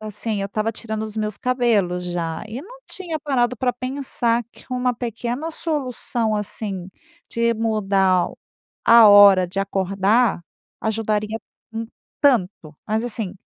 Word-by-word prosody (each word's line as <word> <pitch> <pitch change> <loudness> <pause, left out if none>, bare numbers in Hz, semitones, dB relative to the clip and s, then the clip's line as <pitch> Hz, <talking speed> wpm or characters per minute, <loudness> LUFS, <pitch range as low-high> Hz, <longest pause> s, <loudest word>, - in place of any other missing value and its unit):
assim, 215 0 -4
eu 195 - -3
tava 215 +2 -1
tirando 220 -1 -4
os 215 0 -8
meus 215 -1 -2
cabelos 225 -8 +1
já, 170 -2 -3
e 235 +4 -6
não 480 - -13
tinha 340 -4 -4
parado 250 -4 0
pra 250 +2 0
pensar 245 -2 -1
que - - -18
uma 250 0 0
pequena 240 +6 -4
solução, 250 -8 -1
assim, 195 -3 -4 0.4
de 235 0 +1
mudar 195 -5 +2 0.6
a 230 -1 +8
hora 200 -2 +8
de 185 +3 -3
acordar, 195 +2 +1 0.4
ajudaria 215 0 -1 0.3
em 225 0 -4 0.3
tanto! 185 - +1
Mas 220 +2 0
assim 215 -5 -4
220 Hz, 135 wpm, -22 LUFS, 200-245 Hz, 0.6 s, a